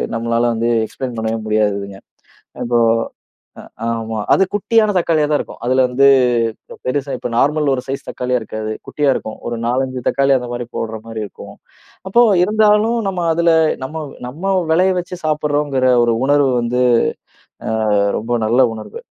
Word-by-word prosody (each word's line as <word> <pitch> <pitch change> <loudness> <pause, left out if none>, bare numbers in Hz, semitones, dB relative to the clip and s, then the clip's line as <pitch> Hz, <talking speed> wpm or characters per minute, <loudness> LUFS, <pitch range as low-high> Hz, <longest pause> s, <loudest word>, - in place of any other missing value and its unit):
நம்மளால 115 +1 0
வந்து 115 +1 0
எக்ஸ்பிளைன் 125 0 -6
பண்ணவே 110 0 -2
முடியாததுங்க. 100 -2 -1 0.7
இப்போ 120 0 +1 0.8
அ - - -14 0.2
ஆமா. 115 -1 -3 0.2
அது - - +4
குட்டியான 215 +1 +2
தக்காளியா 160 -3 +2
தான் 150 - +3
இருக்கும். - - -8
அதுல 130 +1 +3
வந்து 135 +3 +3 0.8
பெருசா 140 +1 -2
இப்போ - - -5
நார்மல் 150 0 +2
ஒரு 125 - -2
சைஸ் 135 +1 -5
தக்காளியா 125 0 -1
இருக்காது, 110 0 -5 0.2
குட்டியா 145 -2 0
இருக்கும். 110 - -5
ஒரு 120 - -3
4,5 130 +1 -1
தக்காளி 140 0 +2
அந்த 125 -1 -5
மாரி 120 0 -4
போடுற 110 -1 -3
மாரி 115 -1 -6
இருக்கும். 100 - -12 0.5
அப்போ 235 +5 +4 0.2
இருந்தாலும் 215 +3 +3
நம்ம 180 -3 -2
அதுல 170 +1 +2 0.3
நம்ம 155 +4 -5 0.2
நம்ம 170 +10 -3 0.2
வெளைய 185 +3 +3
வச்சு 180 +1 -6
சாப்பிடுறோம்ங்கிற 145 -3 0 0.2
ஒரு 120 -1 +2
உணர்வு 145 -1 +3
வந்து 125 +1 -1 0.9
அ - - -1 0.5
ரொம்ப 120 +2 -1
நல்ல 120 +4 +3
உணர்வு. 110 - -9
130 Hz, 150 wpm, -18 LUFS, 115-155 Hz, 0.9 s, அது